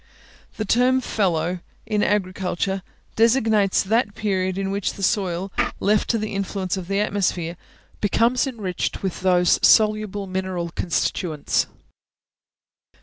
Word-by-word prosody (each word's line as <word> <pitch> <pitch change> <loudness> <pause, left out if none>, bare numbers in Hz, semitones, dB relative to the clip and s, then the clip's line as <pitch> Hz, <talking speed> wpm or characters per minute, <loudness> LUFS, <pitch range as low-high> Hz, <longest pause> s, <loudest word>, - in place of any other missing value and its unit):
The 215 - -2
term 250 +4 +3
fallow, 180 -7 0 0.3
in 215 -1 0
Agriculture, 190 -1 -1 0.3
designates 220 -4 +3
that 210 0 +1
period 190 -3 -1
in 195 0 -2
which 200 -1 -1
the 195 - -8
soil, 190 -2 0 0.3
left 210 +1 +1
to 230 - +2
the 215 -1 -4
influence 195 -1 -2
of 185 -2 -6
the 195 +1 0
atmosphere, 185 -5 -1 0.5
becomes 235 +6 +2
enriched 205 -10 -3
with 190 -3 -2
those 180 -1 +3
soluble 215 -2 +3
mineral 185 -2 -3
constituents. 160 -2 -1
195 Hz, 120 wpm, -23 LUFS, 185-215 Hz, 0.5 s, term